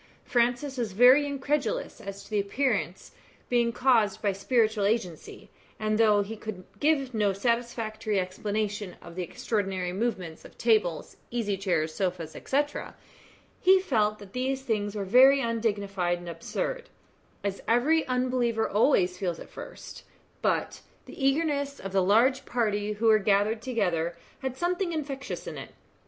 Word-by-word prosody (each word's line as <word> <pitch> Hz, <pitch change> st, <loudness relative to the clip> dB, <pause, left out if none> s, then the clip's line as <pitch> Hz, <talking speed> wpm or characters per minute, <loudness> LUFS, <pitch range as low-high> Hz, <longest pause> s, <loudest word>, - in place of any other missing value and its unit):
Francis 245 Hz, +3 st, 0 dB
was 225 Hz, -5 st, -2 dB
very 255 Hz, +7 st, +6 dB
incredulous 290 Hz, -, -2 dB
as 200 Hz, 0 st, -7 dB
to -, -, -17 dB
the 210 Hz, -, +1 dB
appearances 200 Hz, -3 st, -1 dB, 0.4 s
being 235 Hz, -1 st, +2 dB
caused 230 Hz, -5 st, +2 dB
by 205 Hz, -2 st, +1 dB
spiritual 215 Hz, +1 st, +1 dB
agency, 200 Hz, -6 st, -2 dB, 0.3 s
and 215 Hz, 0 st, 0 dB
though 210 Hz, -2 st, +5 dB
he 215 Hz, +3 st, -7 dB
could 210 Hz, -4 st, -7 dB, 0.2 s
give 285 Hz, -4 st, +1 dB
no 210 Hz, -3 st, +2 dB
satisfactory 220 Hz, -1 st, -1 dB
explanation 205 Hz, +1 st, -3 dB
of 170 Hz, -, -12 dB
the 180 Hz, -, -4 dB
extraordinary 190 Hz, 0 st, -2 dB
movements 190 Hz, -6 st, -3 dB
of -, -, -15 dB
tables, 215 Hz, -8 st, +1 dB
easy 225 Hz, -4 st, -1 dB
chairs, 175 Hz, -5 st, -1 dB
sofas, 180 Hz, -4 st, -2 dB
&c., 270 Hz, -, -1 dB, 1.0 s
he 380 Hz, +1 st, +6 dB
felt 215 Hz, -, +1 dB
that 200 Hz, -2 st, -13 dB
these 265 Hz, +1 st, -1 dB
things 210 Hz, -4 st, -1 dB
were 200 Hz, -2 st, -2 dB
very 260 Hz, +7 st, +7 dB
undignified 205 Hz, -7 st, -1 dB
and 175 Hz, 0 st, -9 dB
absurd, 480 Hz, -, -4 dB, 0.5 s
as 200 Hz, -1 st, -3 dB
every 295 Hz, +8 st, +3 dB
unbeliever 250 Hz, -3 st, +1 dB
always 195 Hz, -5 st, +2 dB
feels 175 Hz, -4 st, -2 dB
at -, -, -11 dB
first; -, -, -10 dB, 0.4 s
but -, -, 0 dB, 0.2 s
the 270 Hz, -, -8 dB
eagerness 285 Hz, -1 st, 0 dB
of 195 Hz, -, -6 dB
the 195 Hz, 0 st, +3 dB
large 235 Hz, +8 st, +3 dB
party 210 Hz, -3 st, -1 dB
who 215 Hz, +2 st, -3 dB
were 220 Hz, -1 st, +6 dB
gathered 205 Hz, +2 st, +2 dB
together 175 Hz, -9 st, -1 dB, 0.2 s
had 265 Hz, -1 st, -4 dB
something 350 Hz, +1 st, -1 dB
infectious 280 Hz, -3 st, -4 dB
in -, -, -6 dB
it. -, -, -8 dB
220 Hz, 145 wpm, -28 LUFS, 195-255 Hz, 1.0 s, very